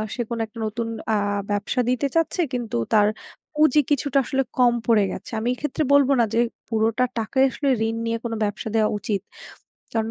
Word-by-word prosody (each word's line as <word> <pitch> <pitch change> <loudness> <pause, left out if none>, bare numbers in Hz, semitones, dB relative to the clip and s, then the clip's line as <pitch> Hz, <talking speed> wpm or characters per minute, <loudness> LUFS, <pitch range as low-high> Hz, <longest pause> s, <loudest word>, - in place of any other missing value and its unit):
সে 245 - -2
কোনো 235 -1 -3
১ - - -20
টা 230 - -9
নতুন 230 +2 -3 0.3
আ - - +3 0.4
ব্যবসা 205 +5 0
দিতে 255 +3 +1
চাচ্ছে। 330 +2 +1
কিন্তু 235 - -2 0.2
তার 210 -1 +5 0.5
পুঁজি 300 -1 +4
কিছুটা 285 -1 +1
আসলে 270 0 0
কম 245 -1 +5
পড়ে 220 -3 +4
গেছে। - - -8
আমি 225 - -3
এক্ষেত্রে 295 +3 -2
বলব 280 -1 +5
না 235 - +5
যে, 230 - +2 0.3
পুরোটা 225 +2 +1
টাকা 225 +4 -3
আসলে 280 +1 -2 0.2
ঋণ 225 - -2
নিয়ে 230 0 0
কোনো 230 -1 -3
ব্যবসা 205 +1 -3
দেওয়া 215 -1 +3
উচিত। 200 0 -2 0.7
কারণ 225 -1 -1
235 Hz, 190 wpm, -23 LUFS, 220-270 Hz, 0.7 s, তার